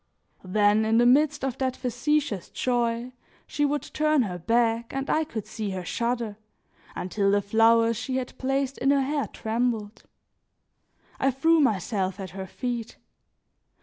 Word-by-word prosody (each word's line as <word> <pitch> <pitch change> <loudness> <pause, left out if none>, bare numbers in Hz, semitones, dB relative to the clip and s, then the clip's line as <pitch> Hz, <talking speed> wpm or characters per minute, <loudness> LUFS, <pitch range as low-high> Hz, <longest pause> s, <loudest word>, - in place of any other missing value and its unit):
Then 205 +3 +3
in 220 +1 +2
the 240 - +5
midst 290 +3 +3
of 265 -1 -3
that 260 -1 0
factitious 250 - -1
joy, 240 0 -1 0.3
she 290 - 0
would 290 +1 -1
turn 305 -3 +1
her 180 -4 -4
back 230 +4 +1
and 270 +1 -3
I 315 - +2
could 225 -9 -6
see 215 -2 -5
her 185 -2 -5
shudder 235 0 -2 0.6
until 195 +2 0
the 205 +1 +4
flowers 225 +2 +3
she 255 +2 -3
had 260 -1 -3
placed 270 0 -1
in 270 - +1
her 280 -1 +4
hair 285 +1 -1
trembled. 225 -2 -2 1.1
I 270 - +3
threw 320 +6 +3
myself 200 - 0
at 190 -3 -6
her 190 0 -6
feet. 235 +2 -4
235 Hz, 150 wpm, -26 LUFS, 210-270 Hz, 1.1 s, the